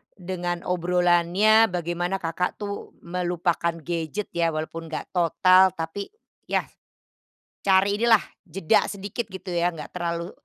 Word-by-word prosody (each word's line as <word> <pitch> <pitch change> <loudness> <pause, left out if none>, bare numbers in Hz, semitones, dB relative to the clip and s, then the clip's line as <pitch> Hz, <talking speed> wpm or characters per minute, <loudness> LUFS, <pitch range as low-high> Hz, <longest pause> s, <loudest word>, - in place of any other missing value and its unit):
dengan 175 -2 -3
obrolannya, 180 +4 +3
bagaimana 175 +2 -2
Kakak 175 +3 -2
tuh 205 -1 -6
melupakan 175 -1 -1
gadget 170 +5 -3
ya, 170 -1 +2
walaupun 160 +1 -5
nggak 155 - -5
total 185 +2 +5
tapi 165 - -5 0.4
ya, - - 0 1.0
cari 195 +1 +4
inilah 230 -3 +5 0.3
jeda 195 -4 +2
sedikit 200 +4 -4
gitu 190 0 -9
ya 175 0 +1
enggak 150 -2 -8
terlalu 170 0 -3
175 Hz, 120 wpm, -25 LUFS, 170-190 Hz, 1.0 s, total